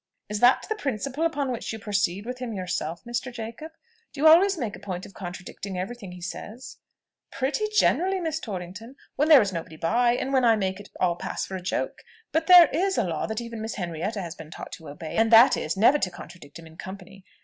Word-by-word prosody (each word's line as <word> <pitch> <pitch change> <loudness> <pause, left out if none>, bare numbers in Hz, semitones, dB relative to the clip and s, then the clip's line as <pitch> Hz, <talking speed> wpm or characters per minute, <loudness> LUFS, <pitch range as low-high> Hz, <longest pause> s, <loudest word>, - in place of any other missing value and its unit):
"Is 210 0 -2
that 245 +3 +5
the 435 - 0
principle 275 - -2
upon 285 -5 -2
which 240 - -4
you 220 - -5
proceed 200 -2 -1
with 250 +1 -5
him 245 -3 -4
yourself, 180 -3 -3
Mr. 240 +2 -3
Jacob? 235 +7 -7 0.4
Do 280 - -11
you 305 - +1
always 365 +4 +6
make 230 -8 -3
a - - -12
point 185 -2 -5
of - - -13
contradicting 185 +1 -7
every 190 +7 -4
thing 200 -6 -10
he 180 - -11
says?" 215 +7 -8 0.5
"Pretty 275 +10 -1
generally, 385 -3 +2
Miss 320 -3 -2
Torrington, 200 - -7 0.2
when 295 +3 +1
there 290 -7 +9
is 195 -2 -3
nobody 160 -2 -6
by, 235 +9 +2
and 265 +2 -2
when 260 -1 +3
I 230 -2 +5
make 190 -2 -2
it 205 - -12
all 175 -2 +1
pass - - -4
for 190 -1 -5
joke. 180 +1 -3 0.3
But 320 +1 0
there 360 -1 +10
is 380 +3 +1
a - - +3
law 165 -4 -2
that 220 +1 -3
even 230 -1 -7
Miss 220 +1 -4
Henrietta 180 +3 -3
has 170 -2 -6
been 160 -3 -11
taught - - -9
to 160 - -9
obey; 155 +2 -7
and 225 +1 +3
that 230 +3 +8
is, 155 +5 -3
never 255 +8 +5
to 185 - 0
contradict 175 -4 -12
him 165 - -12
in 160 0 -15
company. 190 +1 -10
220 Hz, 225 wpm, -26 LUFS, 180-265 Hz, 0.5 s, there